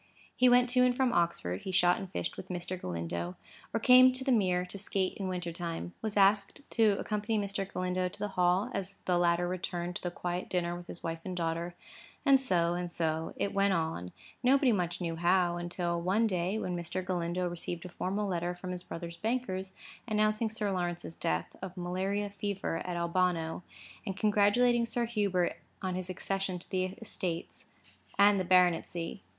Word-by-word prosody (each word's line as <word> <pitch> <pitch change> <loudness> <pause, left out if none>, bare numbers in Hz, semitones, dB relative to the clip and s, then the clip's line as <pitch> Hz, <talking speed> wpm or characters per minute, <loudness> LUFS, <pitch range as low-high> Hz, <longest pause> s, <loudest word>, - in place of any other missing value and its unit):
He 250 0 +5
went 245 0 +6
to 250 0 +5
and 250 0 +3
from 260 -2 +2
Oxford; 170 - 0
he 190 - -4
shot 180 -1 +4
and 190 -2 -7
fished - - -3
with 185 - -8
Mr. 180 0 -3
Galindo, 85 - -4 0.4
or 225 - 0
came 255 +2 +8
to 260 +1 -3
the 265 - +1
Mere 185 -6 +2
to 190 +2 -6
skate 190 -1 -1
in 195 - -3
winter 180 -2 -3
time; 170 +1 -4
was 215 -2 -3
asked 200 +5 +3
to 220 -3 +4
accompany 210 +1 -1
Mr. 200 -1 -2
Galindo 185 0 -1
to - - -10
the 210 - -2
Hall, 180 +1 +2
as 195 0 -3
the 180 -1 +2
latter 175 0 +2
returned 180 -1 -3
to - - -13
the 175 - -2
quiet 175 +1 -4
dinner 175 -1 0
with 175 0 -9
his - - -8
wife 165 0 -3
and 185 -1 -5
daughter; 170 +1 -2 0.5
and 275 -2 +6
so, 175 -9 +2
and 175 0 -3
so, 160 -1 -1
it 200 - -1
went 200 0 +3
on, 160 - -2 0.3
nobody 265 0 +4
much 180 -4 -1
knew 165 -2 -2
how, 175 0 +3
until 175 0 -2
one 195 +6 +2
day, 185 0 0
when 180 -4 -2
Mr. 175 +2 -3
Galindo 180 0 -1
received 175 0 -5
a - - -6
formal 200 +4 -2
letter 175 -1 -1
from 180 +1 -6
his 180 -1 -4
brother's 170 -1 -7
bankers, 190 -3 -2 0.3
announcing 215 0 +2
Sir 215 -2 -1
Lawrence's 175 -3 -2
death, 80 - -2
of 185 0 -7
malaria 190 +3 -1
fever, 200 -4 -2
at 175 -1 -2
Albano, 170 -1 0 0.4
and 195 -3 -4
congratulating 215 +4 +4
Sir 240 0 0
Hubert 200 -6 0 0.3
on 185 -1 -1
his 185 0 -4
accession 190 0 -2
to 175 - -11
the 185 -1 +1 0.2
estates 175 -5 -4 0.5
and 200 0 +6
the - - +1
baronetcy. 175 - +2
185 Hz, 190 wpm, -31 LUFS, 175-205 Hz, 0.5 s, came